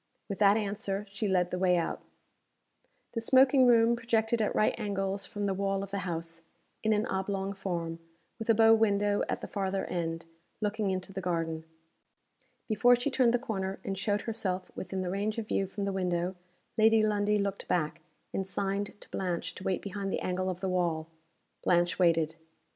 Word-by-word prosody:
With 200 - -5
that 205 0 +6
answer, 205 -1 -2
she 205 +2 -1
led 180 -2 +2
the 180 - -2
way 180 -1 +4
out 170 - -2 1.1
The 230 - -3
smoking 260 +2 +5
room 235 0 +5
projected 230 -1 +1
at 210 - 0
right 215 - +3
angles 200 -2 -2
from 205 -1 -3
the 195 - +1
wall 195 0 -1
of 200 - -8
the 200 - -1
house, 165 -2 -4 0.4
in 220 - +1
an 215 0 +2
oblong 195 0 -2
form 170 -4 -3 0.4
with 225 - -6
a 225 - +6
bow 225 +1 +7
window 205 -2 +3
at - - -2
the - - -5
farther 195 -1 -2
end, 165 -1 -3 0.3
looking 210 -1 0
into 185 0 -3
the 190 - -4
garden. 165 -2 -2 1.0
Before 240 +3 +5
she 245 +4 -1
turned 260 -3 +4
the 245 - +3
corner, 195 -6 -3
and 195 - -2
showed 205 +1 0
herself 190 -5 -3
within 190 0 -4
the 180 - -2
range 205 +3 -1
of 225 -2 -3
view 195 - 0
from 200 +1 -4
the 200 - -1
window 180 -1 -1 0.4
Lady 220 0 +6
Lundie 210 0 +2
looked 200 -1 -2
back, 155 -4 0 0.3
and 195 - -2
signed 200 +1 -2
to - - -10
Blanche 180 -1 -2
to 185 - -10
wait 190 -2 -1
behind 200 -1 -4
the - - -1
angle 185 +1 -1
of 180 -1 -4
the 190 - -1
wall. 170 -3 0 0.5
Blanche 175 0 +2
waited. 165 -2 +3
195 Hz, 185 wpm, -30 LUFS, 180-215 Hz, 1.1 s, bow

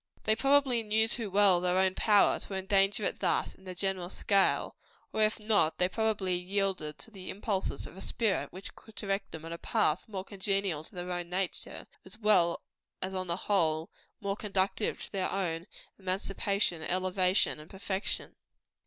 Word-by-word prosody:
They 215 - +3
probably 270 -1 +3
knew 220 +1 +3
too 225 -2 0
well 195 -2 +5
their 185 +1 +3
power, 205 +1 +4
to - - -7
endanger 195 +2 +2
it - - -1
thus - - +1
in 190 - -20
the 185 -1 -6
general 190 -1 -1
scale; 195 0 +2 0.4
or 220 - 0
if 215 +1 +3
not, 210 -7 +2
they 180 - +3
probably 210 -2 0
yielded 185 -4 -1
to 225 - -7
the 190 -3 -9
impulses 200 -1 -2
of - - -11
a 190 - -9
spirit 220 -4 0
which 190 +2 -9
could 220 - -16
direct 195 -1 -2
them 160 0 -8
in 165 - -7
a 170 - -7
path 155 +3 +1
more 195 -4 -5
congenial 195 -5 -1
to - - -13
their 180 0 -4
own 175 -1 -3
nature, 185 0 -3 0.2
as 190 +3 -12
well 195 -6 +3 0.4
as 190 +1 -2
on 185 -1 -2
the 170 - +1
whole 165 -6 +1 0.3
more 200 -1 -2
conducive 200 0 0
to - - -8
their 190 -2 -1
own 175 -2 -2 0.3
emancipation, 195 -1 0
elevation 185 0 +1
and 150 - -12
perfection. 195 +1 -3
195 Hz, 175 wpm, -31 LUFS, 180-205 Hz, 0.4 s, well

